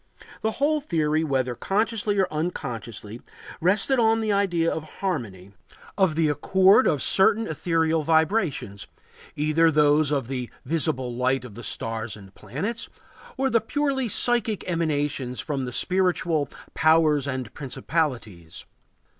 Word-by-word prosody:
The 220 Hz, 0 st, -1 dB
whole 300 Hz, +2 st, +1 dB
theory, 155 Hz, -, 0 dB
whether 130 Hz, -4 st, 0 dB
consciously 210 Hz, -, -1 dB
or 190 Hz, -2 st, +3 dB
unconsciously, 120 Hz, -, -5 dB, 0.4 s
rested 205 Hz, -, +2 dB
on 225 Hz, -1 st, +3 dB
the 220 Hz, -1 st, 0 dB
idea 180 Hz, -5 st, +1 dB
of 160 Hz, -, -4 dB
harmony, 100 Hz, -, -4 dB, 0.4 s
of 190 Hz, -6 st, +2 dB
the 160 Hz, -1 st, +2 dB
accord 190 Hz, -, +4 dB
of 150 Hz, -5 st, +1 dB
certain 220 Hz, +3 st, +3 dB
ethereal 160 Hz, -1 st, 0 dB
vibrations, 160 Hz, -, 0 dB, 0.5 s
either 155 Hz, +2 st, +3 dB
those 150 Hz, -1 st, +3 dB
of 140 Hz, -5 st, -1 dB
the 125 Hz, -2 st, -4 dB, 0.2 s
visible 130 Hz, -4 st, -1 dB
light 125 Hz, +1 st, 0 dB
of 120 Hz, -, -10 dB
the 120 Hz, +3 st, -10 dB
stars 110 Hz, 0 st, -4 dB
and 95 Hz, -1 st, -14 dB
planets 155 Hz, -, -5 dB, 0.5 s
or 265 Hz, 0 st, 0 dB
the 230 Hz, -, +3 dB
purely 270 Hz, +1 st, -1 dB
psychic 230 Hz, -1 st, +2 dB
emanations 145 Hz, -7 st, -1 dB
from 140 Hz, -4 st, -3 dB
the 125 Hz, -, -5 dB
spiritual 175 Hz, -2 st, 0 dB, 0.2 s
"powers 155 Hz, -3 st, +3 dB
and 130 Hz, -4 st, -4 dB
principalities." 125 Hz, -, -4 dB
155 Hz, 130 wpm, -25 LUFS, 130-195 Hz, 0.5 s, accord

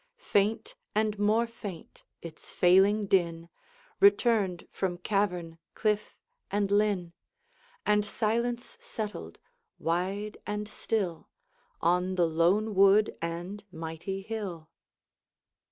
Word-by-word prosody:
Faint, 225 Hz, -, 0 dB, 0.2 s
and 215 Hz, -1 st, +1 dB
more 215 Hz, +3 st, +3 dB
faint, 205 Hz, -7 st, -9 dB, 0.2 s
its 165 Hz, -2 st, -10 dB
failing 195 Hz, +4 st, +4 dB
din 170 Hz, -3 st, +1 dB, 0.5 s
Returned 200 Hz, -3 st, +3 dB
from 180 Hz, -2 st, -2 dB
cavern, 180 Hz, -4 st, -1 dB, 0.2 s
cliff, 210 Hz, -1 st, -1 dB, 0.3 s
and 200 Hz, -1 st, 0 dB
linn, 200 Hz, -4 st, +1 dB, 0.7 s
And 210 Hz, 0 st, +3 dB
silence 235 Hz, +3 st, -2 dB
settled, 210 Hz, -2 st, -6 dB, 0.4 s
wide 190 Hz, +5 st, -2 dB
and 210 Hz, 0 st, -3 dB
still, 200 Hz, -5 st, -2 dB, 0.5 s
On 180 Hz, +2 st, +2 dB
the 175 Hz, -2 st, +3 dB
lone 175 Hz, +7 st, +2 dB
wood 200 Hz, +2 st, +5 dB
and 175 Hz, +5 st, -4 dB
mighty 165 Hz, +4 st, -5 dB
hill. 190 Hz, -7 st, -5 dB
200 Hz, 100 wpm, -29 LUFS, 175-210 Hz, 0.7 s, wood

